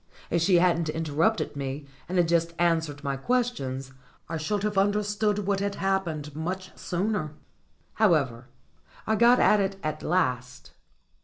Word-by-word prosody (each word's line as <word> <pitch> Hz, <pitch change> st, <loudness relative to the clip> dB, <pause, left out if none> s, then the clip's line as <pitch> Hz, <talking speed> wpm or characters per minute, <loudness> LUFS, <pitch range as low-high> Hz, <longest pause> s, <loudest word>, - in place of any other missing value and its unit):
If 170 Hz, -, +2 dB
she 180 Hz, +2 st, +4 dB
hadn't 170 Hz, -2 st, +3 dB
interrupted 160 Hz, +6 st, 0 dB
me, 140 Hz, +1 st, -4 dB, 0.2 s
and 185 Hz, -, -1 dB
had 175 Hz, -2 st, +4 dB
just 170 Hz, 0 st, +1 dB
answered 160 Hz, -4 st, 0 dB
my 140 Hz, -2 st, -2 dB
questions, 135 Hz, -, -2 dB, 0.3 s
I 165 Hz, -, -3 dB
should 200 Hz, +6 st, -2 dB
have 210 Hz, -1 st, -1 dB
understood 205 Hz, +1 st, +1 dB
what 200 Hz, 0 st, +1 dB
had 200 Hz, 0 st, -2 dB
happened 170 Hz, -7 st, -2 dB
much 185 Hz, +4 st, -4 dB
sooner. 180 Hz, -4 st, -2 dB, 0.6 s
However, 140 Hz, -, +2 dB, 0.6 s
I 220 Hz, -, +1 dB
got 240 Hz, +3 st, +5 dB
at 210 Hz, -, +5 dB
it 195 Hz, 0 st, 0 dB
at 155 Hz, 0 st, -3 dB
last. 125 Hz, -8 st, -1 dB
170 Hz, 145 wpm, -27 LUFS, 150-200 Hz, 0.6 s, got